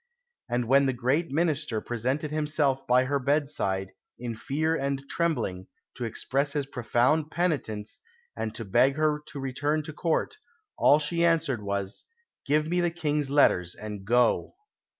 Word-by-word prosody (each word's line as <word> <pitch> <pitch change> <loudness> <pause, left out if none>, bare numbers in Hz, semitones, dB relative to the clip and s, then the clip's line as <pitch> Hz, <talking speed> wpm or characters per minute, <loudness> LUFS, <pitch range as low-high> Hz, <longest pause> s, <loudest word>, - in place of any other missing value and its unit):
And 120 0 0
when 135 +2 +5
the 130 - +1
great 130 +7 0
minister 150 -5 0
presented 130 +7 -2
himself 150 -3 0
by 125 +1 +5
her 140 +2 0
bedside, 135 -9 0 0.3
in 120 -1 -4
fear 155 +7 -1
and 140 -1 -2
trembling, 140 - -1 0.3
to 125 - -4
express 140 +5 -1
his 145 -2 -1
profound 135 +4 +1
penitence 135 -12 -2 0.4
and 110 0 -4
to 115 - -5
beg 130 +8 +3
her 155 -1 +1
to 155 -2 -7
return 145 +3 -1
to 155 - -7
Court, 170 - -1 0.4
all 145 - +5
she 170 +3 0
answered 165 -8 +2
was, 100 -1 -4 0.4
"Give 150 +2 +2
me 175 +2 +1
the 175 - +2
King's 150 -4 -1
letters 90 - +3
and 105 -2 -7
go!" 120 - +2
140 Hz, 150 wpm, -27 LUFS, 120-155 Hz, 0.4 s, when